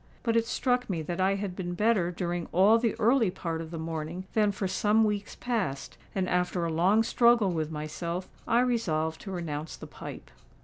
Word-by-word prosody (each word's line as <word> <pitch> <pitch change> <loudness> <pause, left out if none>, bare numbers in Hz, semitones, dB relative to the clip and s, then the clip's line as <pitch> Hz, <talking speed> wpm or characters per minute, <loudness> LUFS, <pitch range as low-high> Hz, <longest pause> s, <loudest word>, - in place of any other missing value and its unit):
But 230 -1 +1
it 230 0 +2
struck 250 0 0
me 170 -4 -2
that 175 +4 -3
I 195 +1 +3
had 195 -2 -4
been 175 -2 -4
better 210 -3 +2
during 175 -1 -3
all 200 +6 +5
the 230 -2 0
early 230 -1 +4
part 165 -2 -4
of 160 - -7
the 165 - -6
morning 160 +2 -4
than 210 -2 +3
for 195 -1 -2
some 210 +4 +3
weeks 210 -1 -1
past; 205 - -2 0.2
and, 190 -2 0
after 180 -1 0
a 165 - -2
long 190 +7 +4
struggle 235 -3 +4
with 160 -3 -2
myself, 170 +4 -4 0.2
I 235 +1 +4
resolved 160 -11 0
to 195 - -7
renounce 160 -4 -4
the - - -9
pipe. - - -9
185 Hz, 195 wpm, -28 LUFS, 165-220 Hz, 0.2 s, all